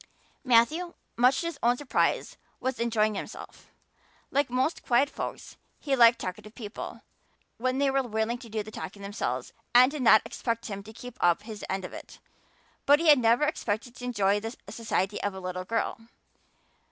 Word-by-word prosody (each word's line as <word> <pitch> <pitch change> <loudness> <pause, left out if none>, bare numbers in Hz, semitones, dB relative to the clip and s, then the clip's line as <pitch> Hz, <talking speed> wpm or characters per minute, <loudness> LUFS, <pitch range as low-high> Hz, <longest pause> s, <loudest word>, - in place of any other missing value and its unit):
Matthew, 300 +8 +3 0.2
much 250 +3 +4
to - - -4
his 335 -4 -4
own 240 +1 +3
surprise, 290 -1 0 0.2
was 260 0 -2
enjoying 220 -2 +1
himself. 195 - -8 0.6
Like 280 -1 +1
most 255 +6 0
quiet 255 +4 +2
folks - - -6 0.2
he 280 -2 0
liked 235 -2 +7
talkative 210 +3 -7
people 215 -3 -7 0.5
when 255 +2 0
they 275 0 +2
were 270 0 +2
willing 230 0 -2
to 235 -3 -11
do 215 0 -2
the 215 - -10
talking 200 -1 -7
themselves 200 +1 -3 0.2
and 255 +2 +8
did 300 -2 -4
not 225 -3 +6
expect 230 -1 -3
him 200 -2 -5
to 210 +2 -12
keep 245 +2 -11
up 175 +3 +3
his 215 -2 -8
end 190 -1 -2
of - - -9
it. - - -10 0.7
But 290 +1 +7
he 330 -1 +3
had 295 -3 +8
never 235 +4 +3
expected 245 -5 -2
to 250 - -7
enjoy 205 -4 +2
the 225 +3 -6
society 210 -3 -1
of 205 -1 -2
a - - -6
little 185 0 -5
girl. 225 +2 -1
235 Hz, 180 wpm, -28 LUFS, 210-260 Hz, 0.7 s, and